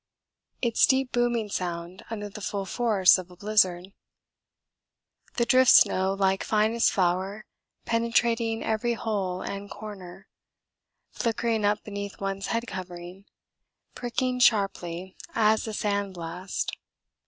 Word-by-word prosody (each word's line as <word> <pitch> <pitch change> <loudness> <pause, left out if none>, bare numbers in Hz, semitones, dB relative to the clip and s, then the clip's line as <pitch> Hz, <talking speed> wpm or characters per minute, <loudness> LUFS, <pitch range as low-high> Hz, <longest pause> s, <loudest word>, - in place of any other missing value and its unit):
Its 235 -2 +4
deep 265 -1 +1
booming 240 -2 +1
sound 175 -2 -4
under 210 -2 -4
the 205 +1 -10
full 195 +1 -3
force 205 -4 +4
of 185 -1 -9
a 180 - -14
blizzard. 185 -2 +1 1.5
The 235 - +1
drift 255 +1 +5
snow 190 +1 +5
like 195 -1 +1
finest 220 +2 +2
flour 190 +3 0 0.4
penetrating 230 0 +1
every 220 +2 0
hole 195 -5 -2
and 200 0 -6
corner 195 -3 -10 0.8
flickering 230 -1 -1
up 205 +1 +1
beneath 200 -1 -6
one's 195 0 -3
head 230 +1 -1
covering, 180 -1 -8 0.7
pricking 250 +1 -2
sharply 190 -6 +1 0.2
as 220 0 +3
a 220 - -4
sand 200 -2 -1
blast. 175 +3 -4
205 Hz, 120 wpm, -26 LUFS, 185-230 Hz, 1.5 s, drift